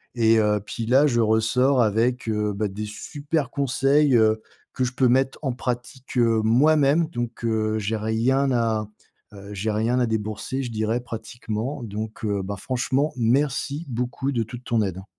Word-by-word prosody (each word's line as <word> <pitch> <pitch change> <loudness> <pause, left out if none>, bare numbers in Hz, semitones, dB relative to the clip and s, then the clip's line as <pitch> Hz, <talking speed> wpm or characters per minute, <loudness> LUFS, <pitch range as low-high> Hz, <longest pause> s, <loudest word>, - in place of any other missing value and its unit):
Et, 115 -1 +4
heu, 105 -1 +2
puis 115 +1 -5
là, 135 +4 +5
je 120 -3 +1
ressors 120 +4 +3
avec, 115 +3 +1
heu, 105 -1 0
bah, 105 +1 -1
des 105 +2 -5
super 145 +5 -3
conseils, 140 +1 +2
heu, 110 0 +3 0.3
que 130 - -1
je 125 - -4
peux 130 0 +3
mettre 130 +1 +2
en 135 -4 -1
pratique, 125 +1 -5
heu, 115 -2 +3
moi-même. 145 +6 +4
Donc, 120 -4 -5
heu, 110 -1 0
j'ai 110 +2 -2
rien 120 +6 +1
à 115 -3 0 0.5
heu, 100 0 -10
j'ai 105 +2 -2
rien 115 +4 +1
à 125 - +3
débourser, 110 +5 -3
je 120 - -5
dirais 110 +2 -1
pratiquement. 120 +2 -5
Donc, 110 +1 -6
heu, 100 -2 0
ben, 100 +1 -4
franchement, 130 +6 -1
merci 140 +5 0
beaucoup 125 +3 -2
de 115 -3 0
toute 120 +3 -9
ton 115 -3 +1
aide. 95 -1 -3
120 Hz, 175 wpm, -24 LUFS, 110-130 Hz, 0.5 s, là